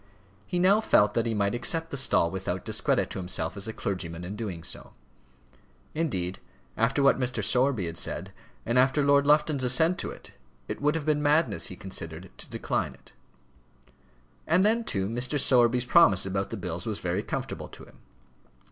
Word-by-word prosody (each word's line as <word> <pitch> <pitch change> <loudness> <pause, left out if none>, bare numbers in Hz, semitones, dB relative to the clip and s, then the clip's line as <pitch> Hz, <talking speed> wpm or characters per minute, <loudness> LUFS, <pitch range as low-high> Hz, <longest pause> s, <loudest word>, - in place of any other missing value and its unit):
He 180 - -2
now 195 +4 +4
felt 105 - +3
that 115 0 0
he 115 - -1
might 100 0 0
accept 160 +8 -1
the - - -3
stall 125 -10 +2
without 95 0 -4
discredit 125 +5 0
to 100 - -4
himself 90 -2 -2
as 100 +1 -5
a - - -3
clergyman 90 -6 -4
in 95 +4 -6
doing 95 -7 -5
so. - - -7 1.0
Indeed, 95 - -2 0.4
after 130 +5 +1
what 140 - +4
Mr. 125 -1 -2
Sowerby 125 -6 +2
had 85 0 -4
said, - - -3 0.3
and 120 +2 +2
after 135 +3 +3
Lord 140 0 +4
Lufton's 150 -2 +3
assent 160 +8 +3
to - - -3
it, - - -11 0.4
it - - -5
would 150 +2 +2
have 160 -3 -3
been 150 -1 +1
madness, 150 - +2
he 95 - -8
considered, 90 -2 -7
to - - -5
decline - - -2
it. - - -19 1.4
And 180 +5 +4
then, 225 +2 +2
too, 95 - -1
Mr. 125 +6 -1
Sowerby's 125 -1 +4
promise 125 - +5
about 95 +1 -2
the - - -5
bills 90 0 -5
was 105 -2 -1
very 90 0 -2
comfortable - - -5
to - - -13
him. - - -17
120 Hz, 185 wpm, -27 LUFS, 95-145 Hz, 1.4 s, promise